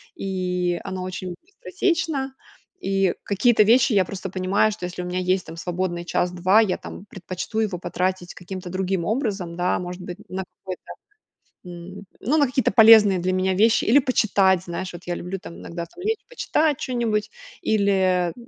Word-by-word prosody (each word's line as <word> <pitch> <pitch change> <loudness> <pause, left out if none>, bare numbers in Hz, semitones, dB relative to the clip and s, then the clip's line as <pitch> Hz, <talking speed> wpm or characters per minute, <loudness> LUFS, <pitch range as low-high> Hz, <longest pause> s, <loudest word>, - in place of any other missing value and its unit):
и 180 -2 -1
оно 185 -1 -5
очень 185 -1 -5
быстротечно. 335 - -2 0.5
И 195 - +1
какие-то 215 +3 +3
вещи, 235 +3 +4
я 195 -2 +4
просто 190 +1 -6
понимаю, 190 +4 +1
что 180 - -6
если 180 0 -5
у - - -5
меня 180 +1 -2
есть 185 0 0
там 165 - -9
свободный 175 0 -3
час-два, 180 +4 +2
я, 205 -5 0
там, 195 - -10
предпочту 190 +2 -5
его 210 -5 0
потратить 180 0 -2
каким-то 180 0 -8
другим 185 -1 -1
образом, 205 -7 -2
да. 180 +1 +1
Может 180 0 -6
быть 180 +1 -7
на 190 +1 -3 0.2
какой-то, 185 -1 -8 0.8
м, 180 +3 -9
ну, 290 +7 +1
на 290 - +5
какие-то 260 -2 +1
полезные 215 -3 +7
для 185 +1 0
меня 185 0 +1
вещи 220 +4 +3
или 265 +6 +6
почитать, 195 -8 +2
знаешь. 180 +2 -5
Вот 175 0 -10
я 175 - -1
люблю, 185 +3 -5
там, 170 - -10
иногда, 170 0 -6
там, 360 - -13
лечь 440 +1 -1
почитать 310 - +1
чё-нибудь. 230 -4 -1 0.3
Или, 190 - +2
э, - - -14
190 Hz, 170 wpm, -23 LUFS, 180-220 Hz, 0.8 s, полезные